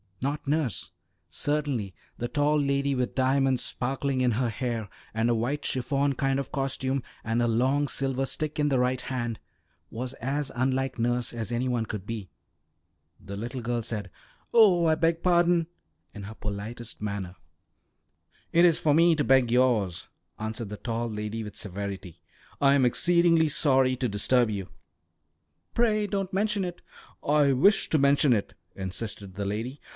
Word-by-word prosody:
Not 145 +1 -2
nurse. 145 - -1 0.4
Certainly 140 -10 -2 0.2
the 120 - -2
tall 150 +3 +2
lady 140 0 +1
with 125 -1 -2
diamonds 130 0 +2
sparkling 135 +1 -2
in 125 -1 +3
her 120 +2 0
hair, 115 -1 -3 0.3
and 115 +1 +1
a 120 - +3
white 130 +6 -1
chiffon 140 +2 0
kind 135 +1 0
of 140 - -5
costume, 135 0 -1 0.2
and 115 +1 0
a 120 - +2
long 130 +5 +2
silver 135 -1 -1
stick 155 +2 -3
in 150 0 +2
the 135 - +2
right 125 +1 +1
hand, 120 -3 -3 0.5
was 125 +3 -5
as 140 +3 -2
unlike 130 +1 0
nurse 120 +1 0
as 115 -1 -4
any 120 +2 0
one 120 -3 0
could 105 -3 -6
be. 105 -4 -5 0.9
The 100 0 -8
little 120 +4 -5
girl 120 0 -1
said, 105 -4 -5 0.4
"Oh, 195 -7 +6
I 160 - +4
beg 165 +1 +1
pardon!" 175 -2 +3 0.5
in 100 - -8
her 110 +3 -8
politest 110 +3 -6
manner. 100 -3 -4 1.2
"It 170 +1 +5
is 165 -2 +4
for 150 - +3
me 165 +1 +5
to 150 - 0
beg 130 -3 +4
yours," 120 -8 +2 0.3
answered 110 0 -4
the 105 - -6
tall 115 +1 -3
lady 105 +1 -4
with 105 -1 -8
severity. 95 -3 -6 0.4
"I 140 -1 +5
am 140 -2 +4
exceedingly 165 +4 +3
sorry 135 -3 +3
to 125 -1 -1
disturb 115 +4 +2
you." 100 -3 -4 1.0
"Pray 215 -3 +2
don't 195 -2 -2
mention 205 0 +1
it." 175 -1 -5 0.5
"I 145 -1 +4
wish 195 +11 +3
to 155 - +3
mention 140 -1 +4
it," 105 -3 -1 0.2
insisted 95 +1 -5
the 100 +2 -4
lady. 115 +8 -3
130 Hz, 160 wpm, -27 LUFS, 115-145 Hz, 1.2 s, Oh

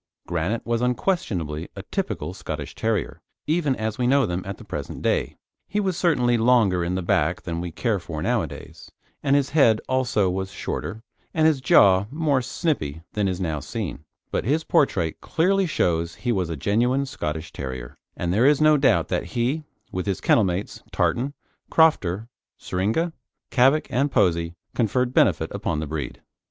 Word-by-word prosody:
Granite 90 +7 -2
was 115 0 0
unquestionably 105 - -1
a - - -7
typical - - -3
Scottish - - -6
Terrier, - - -2 0.2
even 150 -4 +1
as 110 0 -3
we 125 - +2
know 140 +1 +4
them 90 0 -2
at 100 - -5
the - - -12
present - - -6
day. - - 0 0.3
He 210 - -1
was 190 -3 0
certainly 125 -10 +2
longer 110 -7 +4
in 90 +2 -1
the 95 - -2
back 85 0 +1
than 85 -2 -3
we 90 - -4
care 105 +4 0
for 85 -3 -6
nowadays, - - -3 0.3
and 140 -1 +2
his 140 -2 +1
head 125 -8 +5
also 125 -6 +1
was 95 +1 -2
shorter, 110 +3 -5 0.3
and 160 -1 +3
his 155 -4 +3
jaw 100 -5 +5
more 145 -2 +1
snipy 115 - -2
than 105 -2 +1
is 95 -1 -2
now 80 -5 -1
seen, 70 +1 -5 0.3
but - - 0
his 150 +8 +1
portrait 90 - +1
clearly 190 +3 +2
shows 85 - 0
he 120 +6 -2
was 95 -6 0
a 80 - -3
genuine 120 - +1
Scottish 80 - -5
Terrier, 65 -3 -6 0.2
and 85 0 -1
there 115 +7 +4
is 145 -1 +4
no 155 0 +5
doubt 140 - +3
that - - -1
he, 135 +7 0 0.3
with 90 +1 -3
his 95 - -1
kennel 115 - +4
mates, 95 +3 -3
Tartan, 135 +4 0 0.3
Crofter, 110 - +3 0.3
Syringa, 110 - -1 0.4
Cavack, 135 +4 +4
and 140 +3 +1
Posey, 85 -6 +2 0.2
conferred 125 +2 +1
benefit - - +3
upon 80 - -2
the 80 - -2
breed. 75 -3 -5
110 Hz, 170 wpm, -24 LUFS, 85-140 Hz, 0.4 s, head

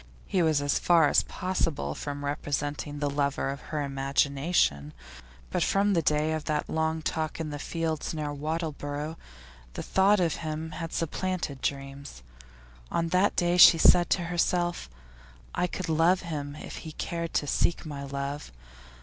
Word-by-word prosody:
He 185 - +1
was 155 -3 +2
as 145 - +1
far 165 -4 +5
as - - +5
possible 165 - -2
from 145 - -5
representing 145 +1 -3
the 145 0 -1
lover 140 -1 0
of 140 - -7
her 150 -2 -1
imagination, 135 - +1 0.6
but - - 0
from 200 +1 +2
the 170 - +3
day 155 0 +1
of 155 -1 -3
that 150 -2 -1
long 160 0 -1
talk 155 0 -2
in 155 -2 -3
the 145 - -5
fields 160 0 -2
near 150 -2 -3
Wattleborough 150 0 -3 0.6
the - - -5
thought 195 +2 +3
of 170 -4 +1
him 160 0 -4
had 165 +1 -5
supplanted 170 -4 -2
dreams. 135 - -5 0.7
On 165 0 -1
that 185 +4 +2
day 175 0 +2
she 175 -1 +10
said 175 +1 +6
to 180 - +2
herself: 175 - 0 0.6
I 180 - +1
could 185 0 -5
love 165 +3 +3
him 145 -4 -5
if - - -8
he 160 - -8
cared 170 +1 -4
to - - +2
seek 170 +4 0
my 145 -2 -6
love. 140 - -5
155 Hz, 160 wpm, -28 LUFS, 145-170 Hz, 0.7 s, she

